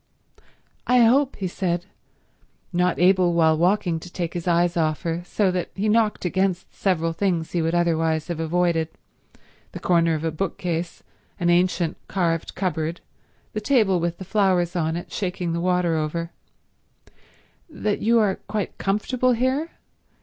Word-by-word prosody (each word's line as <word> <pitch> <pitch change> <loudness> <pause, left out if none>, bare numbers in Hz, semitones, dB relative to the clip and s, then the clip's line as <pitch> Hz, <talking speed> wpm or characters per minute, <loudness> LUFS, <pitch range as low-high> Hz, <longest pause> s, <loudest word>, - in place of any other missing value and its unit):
"I 250 0 +5
hope," 260 +4 +4
he 190 - -3
said, 175 -1 -2 0.9
not 180 0 +1
able 180 -1 +4
while 160 -1 +4
walking 175 0 +1
to 175 +2 -11
take 170 -2 -3
his 175 0 -5
eyes 175 0 +2
off 155 -4 0
her, 165 0 -2
so 195 0 +1
that 180 -1 -2
he 205 +3 -1
knocked 215 -2 +2
against 185 0 -1
several 165 -4 0
things 170 -3 -1
he 175 - 0
would 165 +1 0
otherwise 165 -2 +1
have 170 -2 -4
avoided—the 165 -1 -4
corner 170 -2 +3
of 155 - -4
a 165 - 0
bookcase, 175 0 -3 0.4
an 175 0 +2
ancient 175 -1 +1
carved 170 -4 -1
cupboard, 170 -3 -2 0.5
the 215 - -3
table 210 -7 +3
with 170 0 -2
the 190 - -8
flowers 185 -4 +1
on 160 -2 0
it, 175 - -8
shaking 180 -3 -2
the 170 - -2
water 180 -2 +1
over—"that 170 - -7
you 230 +2 +3
are 205 -4 +2
quite 210 -1 -3
comfortable 245 +6 +1
here? 260 +7 0
175 Hz, 150 wpm, -23 LUFS, 165-195 Hz, 0.9 s, I